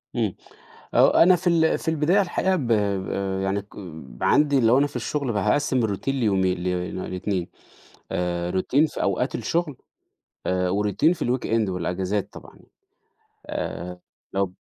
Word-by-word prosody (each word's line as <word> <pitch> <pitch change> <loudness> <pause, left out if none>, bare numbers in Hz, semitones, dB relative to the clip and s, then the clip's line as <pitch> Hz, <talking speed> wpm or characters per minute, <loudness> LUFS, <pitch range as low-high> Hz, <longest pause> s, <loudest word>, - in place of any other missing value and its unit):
إمم، 110 -6 0 0.6
هو - - +7
أنا 180 +2 +6
في 180 +1 -3
ال 165 -2 +3
في - - -11
البداية 160 +5 +3
الحقيقة 190 +1 0
ب 140 -8 -2
ب 115 - 0 0.7
يعني 100 +1 0
ك 100 - -20 0.5
عندي 145 -2 +4
لو 115 +3 +5
أنا 145 +1 +3
في 145 - -17
الشُغل 140 -5 -2
فهقسّم 125 +3 +1
الroutine 100 +5 -5
ليومين 95 -8 +1
ل 90 0 -2 0.2
ل2 90 -1 -2 0.6
آآ 90 0 -1
routine 140 - +1
في - - -3
أوقات 100 +7 0
الشُغل، 165 -6 -1 0.7
آآ 90 0 +1
وroutine 105 - +2
في 180 - -4
الweekend 115 -4 0
والأجازات 95 +2 -2
طبعًا، - - -13 0.9
آآ 90 0 -5 0.4
لو 95 -2 0
110 Hz, 145 wpm, -24 LUFS, 95-145 Hz, 0.9 s, هو